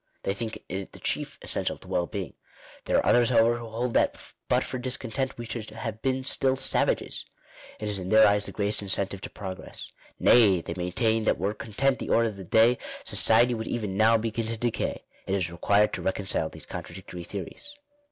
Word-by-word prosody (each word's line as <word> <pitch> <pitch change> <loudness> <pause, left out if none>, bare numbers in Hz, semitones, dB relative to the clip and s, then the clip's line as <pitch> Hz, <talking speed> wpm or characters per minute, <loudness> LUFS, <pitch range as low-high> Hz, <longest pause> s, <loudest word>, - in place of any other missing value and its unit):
They 95 - 0
think 110 +2 -5
it 95 +1 -5
the - - -12
chief - - -3
essential - - 0
to - - -16
well 85 -1 0
being. 100 -5 -5 0.5
There - - +2
are - - +2
others, 120 -1 +4
however, 120 0 +4
who 120 - -7
hold 115 +2 -2
that - - +2 0.3
but - - +3
for 130 - -4
discontent 130 +1 -3
we 120 - -6
should 115 -1 -5
have 110 -2 -6
been 130 0 0
still 135 0 +2
savages. 135 - 0 0.6
It 105 - -4
is 105 -2 -2
in 90 0 -5
their 110 +1 +7
eyes 105 0 +3
the - - -6
greatest 105 0 0
incentive 100 0 -2
to - - -6
progress. 95 -2 -7 0.3
Nay, 105 -7 +6
they 85 - -5
maintain 110 +5 0
that - - +2
were 100 +2 -1
content 115 +5 0
the - - -5
order 115 0 +3
of 105 - -10
the 95 - -7
day, 115 +7 +4 0.2
society 120 +2 +4
would 110 -1 -4
even 105 -5 -2
now 110 +2 +5
begin 115 0 -2
to 115 0 -3
decay. 120 0 -2 0.2
It 95 - +1
is 90 -4 -1
required 100 +5 +2
to - - -3
reconcile 95 +1 0
these - - -11
con - - -5
tradictory 90 - -9
theories. 105 - -7
110 Hz, 205 wpm, -27 LUFS, 100-120 Hz, 0.6 s, their